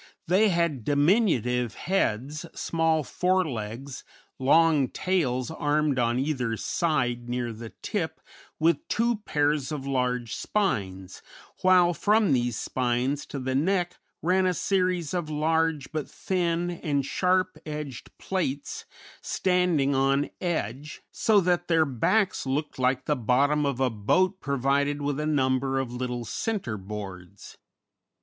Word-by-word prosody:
They 195 +5 +4
had 170 - 0
diminutive 145 - +2
heads, 150 - -1
small 165 -1 +1
fore 185 +5 +1
legs, 120 +2 -6 0.4
long 150 0 +4
tails 155 -8 -1
armed 150 -3 +1
on 120 0 +1
either 130 -5 -1
side 120 -8 -1
near 120 -1 -2
the 115 +1 -8
tip, 160 -6 -2 0.4
with 170 - +1
two 235 0 +1
pairs 150 -7 0
of 145 -3 -4
large 125 -3 -1
spines, 95 - -2 0.4
while 180 -1 +5
from 210 -2 +3
these 120 -2 0
spines 130 +3 -1
to - - -6
the 130 0 -2
neck 175 +5 0 0.2
ran 185 +2 +3
series 180 -4 0
of 175 -4 -2
large, 155 -1 0
but 155 -3 -4
thin, 175 -2 -1
and 145 -5 -1
sharp 185 +4 +1
edged 150 -5 -6
plates 145 -7 -3 0.4
standing 180 -7 +1
on 135 +1 +1
edge, 150 - -3
so 215 -2 +3
that 175 -1 +1
their 165 -2 +4
backs 150 - +1
looked 145 +1 -2
like 130 0 +1
the 150 - +1
bottom 140 +5 +2
of 135 -2 -2
a 130 -2 +2
boat 185 - +1
provided 140 +1 0
with 145 0 -1
a 150 - -1
number 135 -2 +1
of 130 -2 -2
little 125 -1 -3
centreboards. 100 - -5
145 Hz, 130 wpm, -26 LUFS, 125-175 Hz, 0.4 s, while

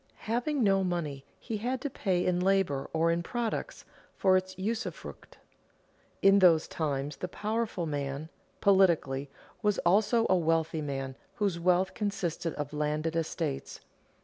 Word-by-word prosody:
Having 245 +5 0
no 195 -2 +3
money 160 -7 -2 0.2
he 225 -3 -4
had 250 +4 -2
to - - -1
pay 185 -6 0
in 180 -1 +1
labor 185 -7 +1
or 165 +1 +2
in 170 +1 0
products, 240 - -3 0.3
for 190 -1 +4
its 185 0 -1
usufruct. 220 +5 -5 0.9
In 195 0 +7
those 170 -4 +5
times 145 -2 -2
the 180 - -4
powerful 215 -2 -2
man, 145 0 -3 0.3
politically, 165 -9 +3 0.3
was 210 -2 +2
also 215 +6 +4
a 185 - +4
wealthy 165 -2 +1
man 135 -2 -4 0.2
whose 200 -6 0
wealth 180 +2 +2
consisted 185 -6 -2
of 145 0 -5
landed 150 +2 -1
estates. 160 -3 -3
180 Hz, 140 wpm, -30 LUFS, 155-200 Hz, 0.9 s, In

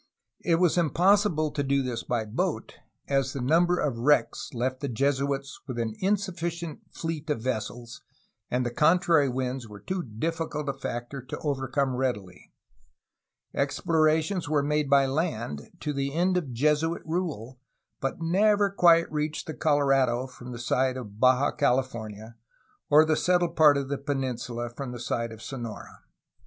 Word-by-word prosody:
It 170 - +3
was 175 0 +3
impossible 175 -1 +3
to 145 - -2
do 140 0 +1
this 120 -3 -3
by 120 -3 -2
boat, 105 - -2 0.3
as 135 -1 +1
the 140 - -4
number 170 +7 +3
of 140 -8 -1
wi^ecks 145 +6 +1
left 130 0 -2
the 140 - -3
Jesuits 140 +2 -1
with 130 -3 -5
an 115 -2 -1
insufficient 175 -5 -2
fleet 160 -1 -5
of 140 -7 -1
vessels 120 -1 -4 0.5
and 125 0 0
the 120 - -1
con 155 +8 +4
trary 165 -7 +3
winds 130 -1 -3
were 105 -1 -10
too 185 - -3
difficult 150 +4 -3
a 140 - 0
factor 135 0 -5
to 125 - -7
overcome 135 -2 0
readily. 105 -8 -3 1.0
Explorations 160 +2 +1
were 150 -2 +2
made 150 0 0
by 140 -1 +5
land, 130 - -2
to 150 - -2
the 140 +1 -2
end 180 +2 +2
of 165 -8 -1
Jesuit 150 +6 +1
rule, 155 - -3 0.4
but 135 - -3
never 200 +4 +3
quite 170 -3 +5
reached 150 0 -2
the 155 - -5
Colorado 135 -5 +2
from 125 -1 -10
the 120 - -6
side 130 +2 0
of 105 -4 -9
Baja 130 +3 +4
California 115 -5 -2 0.5
or 150 +2 +7
the 155 0 +2
settled 175 +1 +1
part 150 -3 +6
of 140 -1 -2
the 140 0 -3
peninsula 125 -4 -3
from 125 0 -6
the 120 - -7
side 115 -1 -2
of 110 0 -10
Sonora. 120 -5 -7
140 Hz, 160 wpm, -27 LUFS, 125-160 Hz, 1.0 s, or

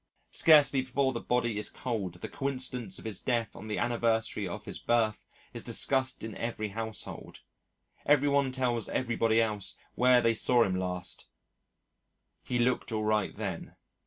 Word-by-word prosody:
Scarcely 145 -4 +6
before 130 +1 0
the 115 - -3
body 120 -3 0
is 105 - -2
cold 105 -9 -4
the 90 - -7
coincidence 130 -7 -3
of - - -11
his 110 -4 -1
death 120 -3 -1
on 110 - -9
the 105 - -2
anniversary 115 -3 0
of 85 - -7
his - - -6
birth 110 -2 +1 0.3
is - - -5
discussed 130 -1 +1
in 110 -2 -6
every 110 -2 -3
household; 110 +1 -5 0.7
every 145 -1 +4
one 140 -2 +2
tells 125 -4 -1
everybody 115 -2 +1
else 105 -3 0 0.2
where 125 0 +5
they 115 -1 +3
saw 120 +1 +4
him 95 -4 -1
last 90 -1 -3 1.1
"he 125 - -2
looked 120 0 +1
all 110 -1 -1
right 105 -2 0
then." - - -5
115 Hz, 160 wpm, -30 LUFS, 110-130 Hz, 1.1 s, Scarcely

